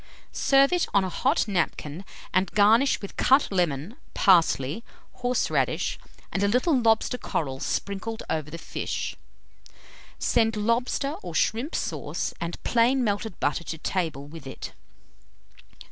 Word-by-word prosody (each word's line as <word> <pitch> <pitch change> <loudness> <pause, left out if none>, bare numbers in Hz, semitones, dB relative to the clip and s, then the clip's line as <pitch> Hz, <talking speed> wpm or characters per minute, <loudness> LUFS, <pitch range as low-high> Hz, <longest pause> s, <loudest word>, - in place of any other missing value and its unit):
Serve 275 +3 +4
it 355 - +2
on 200 - +5
a 185 - -2
hot 265 - +1
napkin, 175 -3 -2 0.3
and 185 +1 +2
garnish 220 +6 +4
with 200 - -7
cut 265 -2 +4
lemon, 175 - -1 0.2
parsley, 170 - +3 0.3
horseradish, 250 0 0 0.3
and 195 - -1
a 200 - +3
little 250 - +2
lobster 230 0 +2
coral 135 -4 -3
sprinkled 205 +7 -3
over 155 -2 -2
the 165 - -7
fish. - - -4 1.0
Send 225 -1 +2
lobster 245 +6 0
or 175 -3 -7
shrimp 235 - 0
sauce - - -3
and 170 0 -5
plain 245 +2 +3
melted 205 -2 -2
butter 145 +3 0
to 160 - -5
table 160 -5 -2
with 150 -1 -10
it. - - -7
200 Hz, 130 wpm, -26 LUFS, 165-245 Hz, 1.0 s, on